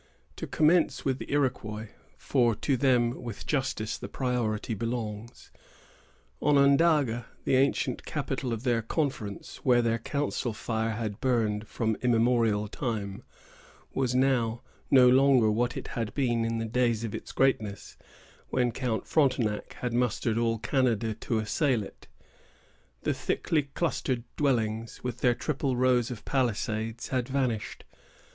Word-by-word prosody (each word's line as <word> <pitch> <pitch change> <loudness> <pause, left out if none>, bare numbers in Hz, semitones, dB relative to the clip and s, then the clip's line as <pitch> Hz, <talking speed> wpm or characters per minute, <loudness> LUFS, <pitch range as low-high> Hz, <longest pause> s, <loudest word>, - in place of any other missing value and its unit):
To - - -5
commence 160 +2 +2
with 135 -1 0
the - - -7
Iroquois, 115 -6 -1 0.3
for 120 -5 +2
to 135 +6 0
them 125 -2 +2
with 120 -4 -7
justice 130 -7 -1
the - - -7
priority 120 -4 -1
belongs: 115 0 -5 0.9
Onondaga, 140 -3 +3 0.2
the - - +2
ancient 130 -1 +1
capital 135 -3 -3
of 115 0 -3
their 120 -3 +2
confederacy, 115 -5 -3
where 120 -2 +4
their 115 0 +1
council 140 -1 -2
fire 110 +1 -2
had 110 -3 -4
burned 110 -4 0
from 110 -2 -1
immemorial 115 -3 +2
time, 105 -3 -4 0.7
was 130 -2 0
now 125 -3 +1 0.3
no 130 -2 +7
longer 130 -3 +5
what 120 +3 0
it - - -6
had 115 -3 -4
been 120 -5 +1
in 115 0 -1
the 115 - -2
days 115 -1 +1
of 115 - -4
its - - -6
greatness, 110 -7 0 0.5
when 125 -2 +1
Count 120 -2 -2
Frontenac 125 -8 +1
had 125 -2 -2
mustered 120 -2 0
all 115 -1 +1
Canada 115 -2 +1
to 110 +1 -2
assail 115 +2 +1
it. - - -13 1.0
The - - +1
thickly 150 -4 -1
clustered 130 -7 -1
dwellings, 115 -5 -1
with 125 -1 -4
their 125 -2 +3
triple 135 0 -1
rows 125 -2 +3
of 120 -4 -7
palisades, 115 -3 -1
had 130 -1 -1
vanished. 125 -6 -2
120 Hz, 140 wpm, -28 LUFS, 110-130 Hz, 1.0 s, no